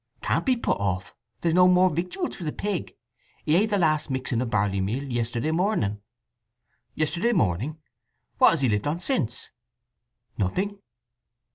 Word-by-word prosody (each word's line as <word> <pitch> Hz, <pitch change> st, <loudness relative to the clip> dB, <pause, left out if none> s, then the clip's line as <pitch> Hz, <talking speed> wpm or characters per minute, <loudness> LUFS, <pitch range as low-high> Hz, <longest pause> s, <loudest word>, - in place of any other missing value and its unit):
"Can't -, -, 0 dB
be 260 Hz, -, +4 dB
put 235 Hz, -, 0 dB
off. 95 Hz, -2 st, -2 dB, 0.3 s
There's 165 Hz, -1 st, +1 dB
no 180 Hz, +1 st, +6 dB
more 180 Hz, 0 st, +5 dB
victuals 180 Hz, -, -3 dB
for -, -, -8 dB
the 155 Hz, -, -2 dB
pig. 200 Hz, 0 st, -3 dB, 0.5 s
He 155 Hz, -, +3 dB
ate 210 Hz, +5 st, +3 dB
the 205 Hz, -, +1 dB
last 155 Hz, -5 st, +2 dB
mixing 130 Hz, -3 st, -1 dB
o' 125 Hz, -, -1 dB
barleymeal 105 Hz, +5 st, -1 dB
yesterday 120 Hz, +5 st, -1 dB
morning." 160 Hz, -, 0 dB, 0.9 s
"Yesterday 175 Hz, +9 st, +1 dB
morning? 130 Hz, -, 0 dB, 0.6 s
What -, -, +8 dB
has 165 Hz, -, +1 dB
he 130 Hz, -, +3 dB
lived 105 Hz, +2 st, 0 dB
on 155 Hz, +4 st, -1 dB
since?" 130 Hz, -, -2 dB, 0.9 s
"Nothing." 195 Hz, -, -1 dB
150 Hz, 150 wpm, -25 LUFS, 115-180 Hz, 0.9 s, What